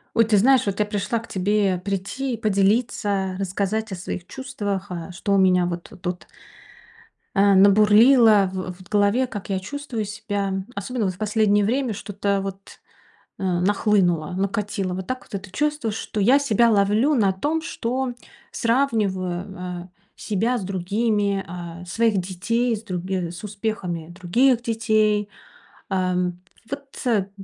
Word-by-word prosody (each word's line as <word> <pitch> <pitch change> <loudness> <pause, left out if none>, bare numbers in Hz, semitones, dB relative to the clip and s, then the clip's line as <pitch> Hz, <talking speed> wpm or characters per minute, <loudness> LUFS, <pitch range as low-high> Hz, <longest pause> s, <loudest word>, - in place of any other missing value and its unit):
Ой, 230 - +5
ты 215 -2 +3
знаешь, 255 +5 +5
вот 200 0 -2
я 210 - +3
пришла 210 +2 -1
к 225 - -12
тебе 195 0 +1
прийти, 200 +8 -3
поделиться, 200 -2 +1
рассказать 200 +3 -2
о - - -3
своих 175 0 -6
чувствах, 205 -5 -4
э, 175 0 -6
что 190 +3 -2
у - - +4
меня 185 -2 +4
вот 175 -1 -6
тут 180 -1 -4 1.1
э, 200 0 +5
набурлило 210 +2 +6
в 185 -1 -4
в 185 - -15
голове, 210 +5 +2
как 205 -4 -7
я 190 -1 0
чувствую 240 +1 -5
себя, 205 -2 -3 0.2
особенно 220 +3 -2
вот 185 - -1
в - - -16
последнее 210 0 +2
время 250 +1 0
что-то 200 -1 -2
вот, 195 0 -8 0.6
э, - - -5
нахлынуло, 180 -2 +2
накатило. 195 -1 -2
Вот 185 0 -5
так 255 0 -4
вот - - -8
это 200 0 -13
чувство, 295 -3 -1
что 210 0 -4
я 255 +8 +5
себя 235 -4 +3
ловлю 215 +7 +3
на 205 -6 +3
том, 295 +12 -1
что 260 -4 -2 0.4
сравниваю, 190 -7 -1
э, - - -15 0.3
себя 225 +4 -1
с 210 - -4
другими, 200 +2 0 0.4
э, - - -9
своих 225 +3 +1
детей, 230 +7 -1
с 215 - -9
други 185 -3 -3
с 175 - -10
успехами 200 -6 -4
других 225 +9 +2
детей. 215 -3 +1 0.6
Э, 185 -2 0
м, 180 0 -1 0.3
вот 255 -7 -2
205 Hz, 150 wpm, -23 LUFS, 190-225 Hz, 1.1 s, набурлило